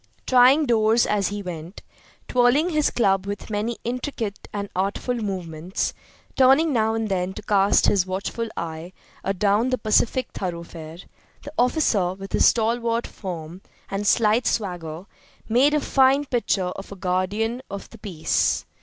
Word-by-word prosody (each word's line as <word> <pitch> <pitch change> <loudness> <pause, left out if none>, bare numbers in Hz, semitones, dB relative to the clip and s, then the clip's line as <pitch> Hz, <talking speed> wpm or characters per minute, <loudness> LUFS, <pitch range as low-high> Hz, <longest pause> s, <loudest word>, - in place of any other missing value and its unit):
Trying 255 +4 +5
doors 225 -1 +3
as 200 -3 +1
he 205 0 -4
went, 175 +1 -8 0.4
twirling 250 +7 +3
his 305 -2 +2
club 195 -4 +1
with 205 +2 -6
many 220 +3 -2
intricate 240 -4 -4
and 200 -1 -4
artful 195 +6 -1
movements, 185 -6 -3 0.4
turning 270 +4 +5
now 220 -2 +1
and 225 -1 -1
then 190 -1 -1
to 215 - -8
cast 200 -1 +3
his 190 -2 +2
watchful 200 +5 -3
eye 165 +2 -5 0.3
adown 200 +5 +1
the 255 - +1
pacific 225 +4 +1
thoroughfare, 170 -3 -6 0.5
the 290 - -9
officer, 230 - +1
with 195 0 -9
his - - +4
stalwart 230 +1 +1
form 175 -2 -7 0.3
and 200 +1 -2
slight 225 +2 +3
swagger, 175 -5 -3 0.4
made 265 +6 +3
a - - +3
fine 275 0 +3
picture 240 -7 0
of 195 +2 -8
a - - -7
guardian 200 +6 -1
of 200 0 -7
the - - -13
peace. 180 -7 0
210 Hz, 145 wpm, -23 LUFS, 185-240 Hz, 0.5 s, Trying